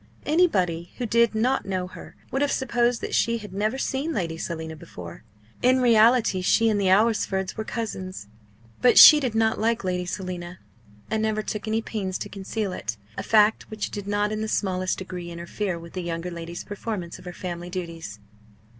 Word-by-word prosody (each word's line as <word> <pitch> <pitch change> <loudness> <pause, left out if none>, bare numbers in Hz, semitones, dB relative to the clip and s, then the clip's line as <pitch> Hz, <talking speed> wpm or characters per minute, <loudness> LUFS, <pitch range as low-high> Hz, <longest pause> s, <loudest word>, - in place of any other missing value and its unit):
Anybody 185 - +1
who 245 - -2
did 235 0 +3
not 250 +5 +1
know 185 -2 -1
her 180 - -11 0.2
would 270 - -1
have 285 - +2
supposed 240 -2 +1
that - - -5
she 230 0 +2
had 210 -4 -10
never 215 +6 -1
seen 275 +4 -2
Lady 165 - -2
Selina 160 -1 -5
before. 90 - -10 0.4
In 255 +1 +4
reality 230 -4 +4
she 225 +5 +3
and 205 -2 +1
the 190 - +2
Alresfords 195 -2 +2
were 220 - -3
cousins. 190 - -5 0.5
But 250 - +5
she 305 - +11
did 255 -6 -2
not 220 0 +2
like 230 +1 +1
Lady 180 -1 -2
Selina, 180 -2 -5 0.5
and 220 0 +1
never 215 -1 0
took 210 0 -4
any 220 +1 0
pains 190 -5 -3
to - - -6
conceal 200 0 -4
it 115 - -4 0.2
a - - -3
fact 215 0 +3
which 215 -1 -4
did 205 -1 -6
not 205 +1 0
in 215 0 -2
the 220 - -2
smallest 185 -3 -1
degree 180 -2 -6
interfere 175 +2 -4
with 170 0 -11
the 185 - -3
younger 170 +1 -4
lady's 170 0 -6
performance 205 -4 -5
of - - -15
her 180 - -5
family 175 -1 -6
duties. 165 - -6
205 Hz, 190 wpm, -25 LUFS, 180-225 Hz, 0.5 s, she